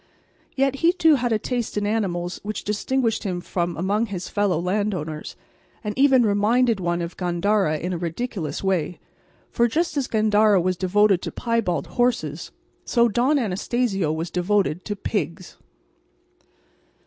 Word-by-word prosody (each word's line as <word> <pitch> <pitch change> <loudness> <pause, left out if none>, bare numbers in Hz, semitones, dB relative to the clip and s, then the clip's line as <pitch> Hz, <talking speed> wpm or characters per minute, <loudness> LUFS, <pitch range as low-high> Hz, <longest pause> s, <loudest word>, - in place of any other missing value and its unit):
Yet 275 0 +1
he 335 +4 +3
too 325 -3 +4
had 245 -4 +1
a 220 - +3
taste 240 0 -3
in 205 - 0
animals 185 -5 -1
which 210 +1 -5
distinguished 225 +3 0
him 180 -3 -3
among 185 +5 0
his 185 -3 -5
fellow 205 -5 +1
landowners, 180 -5 -2 0.5
and 210 -1 -3
even 265 -3 +5
reminded 220 +2 +2
one 175 -1 -1
of 170 - -7
Gandara 180 -1 +1
in 180 +4 -3
a 170 - -3
ridiculous 170 - -4
way. 180 -3 -1 0.5
For 235 - +3
just 315 +5 -1
as 270 -3 0
Gandara 215 -2 +3
was 185 +1 0
devoted 190 +1 +3
to - - -5
piebald 230 -7 -1 0.2
horses, 175 - 0 0.3
so 235 -1 +3
Don 250 +7 +2
Anastacio 205 - 0
was 160 +2 -3
devoted 185 -2 0
to 205 - -3
pigs. 185 -3 -4
205 Hz, 145 wpm, -23 LUFS, 175-235 Hz, 0.5 s, even